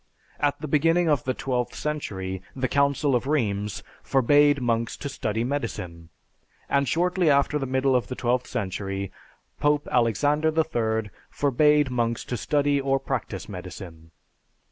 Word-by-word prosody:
At 145 Hz, -1 st, +1 dB
the 155 Hz, -, -5 dB
beginning 165 Hz, +4 st, +3 dB
of 145 Hz, -5 st, +1 dB
the 130 Hz, 0 st, -1 dB
twelfth 125 Hz, -2 st, -2 dB
century, 95 Hz, -11 st, -4 dB
the 130 Hz, -1 st, 0 dB
Council 140 Hz, +1 st, +2 dB
of 125 Hz, +2 st, -1 dB
Rheims 105 Hz, -8 st, -1 dB, 0.2 s
forbade 145 Hz, +2 st, +4 dB
monks 115 Hz, -2 st, -1 dB
to 145 Hz, -, -5 dB
study 110 Hz, -5 st, -2 dB
medicine; 90 Hz, -, -4 dB, 0.6 s
and 140 Hz, 0 st, +1 dB
shortly 180 Hz, 0 st, +2 dB
after 140 Hz, +1 st, +3 dB
the 135 Hz, -, -3 dB
middle 130 Hz, +1 st, +2 dB
of 125 Hz, -, +1 dB
the 125 Hz, -, -5 dB
twelfth 125 Hz, 0 st, 0 dB
century, 100 Hz, -3 st, -3 dB, 0.5 s
Pope 145 Hz, 0 st, +2 dB
Alexander 145 Hz, +6 st, +2 dB
III 110 Hz, -9 st, 0 dB, 0.2 s
forbade 145 Hz, 0 st, +3 dB
monks 115 Hz, -2 st, -1 dB
to 125 Hz, -, -3 dB
study 145 Hz, +2 st, +1 dB
or 135 Hz, 0 st, +1 dB
practice 125 Hz, -7 st, -4 dB
medicine. 90 Hz, -4 st, -9 dB
130 Hz, 145 wpm, -25 LUFS, 110-145 Hz, 0.6 s, forbade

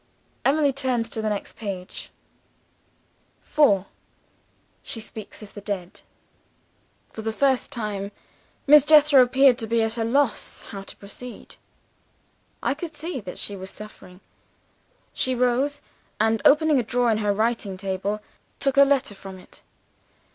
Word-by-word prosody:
Emily 285 Hz, 0 st, +3 dB
turned 255 Hz, -4 st, 0 dB
to 220 Hz, -, -3 dB
the 215 Hz, -, 0 dB
next 205 Hz, -1 st, -4 dB
page. 195 Hz, -5 st, -6 dB, 1.3 s
4. 205 Hz, -11 st, +3 dB, 1.0 s
She 225 Hz, -, -3 dB
Speaks 215 Hz, 0 st, -9 dB
of 205 Hz, -, -12 dB
the 205 Hz, -, -9 dB
Dead. 195 Hz, -4 st, -5 dB, 1.1 s
"For 220 Hz, -, -6 dB
the 220 Hz, 0 st, -2 dB
first 265 Hz, +2 st, +1 dB
time, 205 Hz, -3 st, -4 dB, 0.5 s
Miss 295 Hz, 0 st, +8 dB
Jethro 300 Hz, -2 st, +7 dB
appeared 255 Hz, 0 st, +5 dB
to 225 Hz, -, -2 dB
be 230 Hz, 0 st, +2 dB
at 225 Hz, +1 st, -1 dB
a -, -, +1 dB
loss 240 Hz, 0 st, 0 dB
how 195 Hz, -, -6 dB
to 195 Hz, -, -10 dB
proceed. 230 Hz, +5 st, -10 dB, 1.1 s
I -, -, +2 dB
could 315 Hz, +2 st, -7 dB
see 315 Hz, -1 st, -4 dB
that 185 Hz, -5 st, -8 dB
she 205 Hz, -, -2 dB
was 190 Hz, 0 st, -8 dB
suffering. 195 Hz, -3 st, -11 dB, 0.9 s
She 255 Hz, 0 st, 0 dB
rose, 250 Hz, +4 st, +1 dB, 0.4 s
and 220 Hz, 0 st, +2 dB
opening 300 Hz, -1 st, +5 dB
a -, -, 0 dB
drawer 245 Hz, 0 st, +1 dB
in 215 Hz, -, +1 dB
her 210 Hz, -1 st, +1 dB
writing 215 Hz, -2 st, -1 dB
table, 195 Hz, +2 st, -3 dB, 0.4 s
took 275 Hz, 0 st, +1 dB
a 280 Hz, -, +9 dB
letter 275 Hz, -6 st, +1 dB
from 195 Hz, -1 st, -10 dB
it. 185 Hz, -, -16 dB
225 Hz, 145 wpm, -24 LUFS, 205-275 Hz, 1.3 s, a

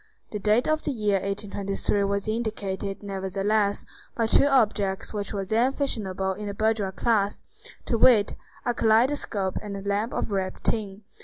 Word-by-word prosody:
The 210 Hz, -, -3 dB
date 215 Hz, +4 st, +2 dB
of 310 Hz, 0 st, +1 dB
the -, -, -3 dB
year 210 Hz, -7 st, +1 dB
1823 200 Hz, 0 st, -1 dB
was 200 Hz, 0 st, -1 dB
indicated, 210 Hz, -3 st, -3 dB
nevertheless, 200 Hz, +1 st, 0 dB, 0.3 s
by 230 Hz, -, +1 dB
two 250 Hz, +5 st, +5 dB
objects 210 Hz, -8 st, +1 dB
which 205 Hz, -2 st, -3 dB
were 195 Hz, -2 st, -3 dB
then 230 Hz, +6 st, +2 dB
fashionable 195 Hz, -9 st, -1 dB
in 205 Hz, +2 st, -6 dB
the 200 Hz, -, -4 dB
bourgeois 215 Hz, -2 st, +1 dB
class: 205 Hz, 0 st, 0 dB, 0.4 s
to 230 Hz, -, 0 dB
wit, 220 Hz, -5 st, +5 dB, 0.3 s
a 245 Hz, -, +1 dB
kaleidoscope 225 Hz, -4 st, +1 dB
and 205 Hz, -1 st, -6 dB
a -, -, -6 dB
lamp 205 Hz, +3 st, -1 dB
of -, -, -2 dB
ribbed 190 Hz, -1 st, -2 dB
tin. 205 Hz, -2 st, -1 dB
205 Hz, 160 wpm, -26 LUFS, 195-225 Hz, 0.4 s, two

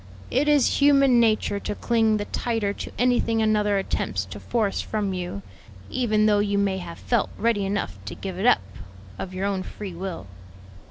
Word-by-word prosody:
"It 280 Hz, +4 st, +2 dB
is 295 Hz, -3 st, +3 dB
human 275 Hz, -3 st, +5 dB
nature 215 Hz, -3 st, +2 dB
to 205 Hz, -, -4 dB
cling 225 Hz, -1 st, +2 dB
the 205 Hz, -, -3 dB
tighter 225 Hz, -4 st, -1 dB
to -, -, -7 dB
anything 240 Hz, -2 st, +2 dB
another 210 Hz, -2 st, +2 dB
attempts 100 Hz, -, -2 dB
to 100 Hz, +2 st, -9 dB
force 200 Hz, -, -1 dB
from 205 Hz, -3 st, -2 dB
you; 175 Hz, -, -5 dB, 0.5 s
even 215 Hz, -4 st, +2 dB
though 210 Hz, -1 st, +4 dB
you 205 Hz, -1 st, +1 dB
may 195 Hz, -1 st, +1 dB
have 170 Hz, -2 st, -8 dB
felt 240 Hz, -3 st, 0 dB
ready 215 Hz, -3 st, +1 dB
enough 200 Hz, +1 st, -3 dB
to -, -, -6 dB
give 190 Hz, -2 st, -6 dB
it 215 Hz, -, +2 dB
up 100 Hz, -, +5 dB, 0.6 s
of 185 Hz, -, -5 dB
your 190 Hz, +1 st, -2 dB
own 195 Hz, -2 st, -1 dB
free 195 Hz, 0 st, -7 dB
will." 180 Hz, -, -6 dB
205 Hz, 180 wpm, -24 LUFS, 195-230 Hz, 0.6 s, human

